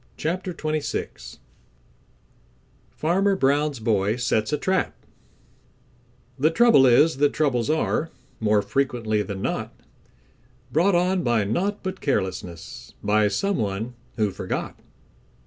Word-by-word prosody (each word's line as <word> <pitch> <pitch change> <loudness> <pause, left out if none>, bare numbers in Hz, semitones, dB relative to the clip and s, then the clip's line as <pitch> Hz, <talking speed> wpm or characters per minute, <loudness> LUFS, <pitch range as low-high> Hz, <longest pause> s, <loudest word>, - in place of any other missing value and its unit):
CHAPTER 180 +4 -2
XXVI 155 -3 -4 1.5
Farmer 195 +5 +1
Brown's 145 -3 +1
Boy 105 -2 +1
Sets 115 -1 0
A 150 - +1
Trap 185 +5 0 1.4
The 150 +4 +4
trouble 165 - +5
is 140 +5 +4
that 145 0 +2
troubles 135 -5 0
are, 160 +1 0 0.3
More 105 -2 +2
frequently 120 -6 0
than 100 -2 -5
not, - - -3 0.9
Brought 175 +5 +3
on 180 +1 +2
by 120 -6 +1
naught 185 - -1
but 190 -1 -5
carelessness; 90 - -4
By 105 0 +3
some 195 - 0
one 105 +3 -3 0.2
who 105 -4 0
forgot. 95 -1 -5
135 Hz, 115 wpm, -24 LUFS, 110-165 Hz, 1.5 s, trouble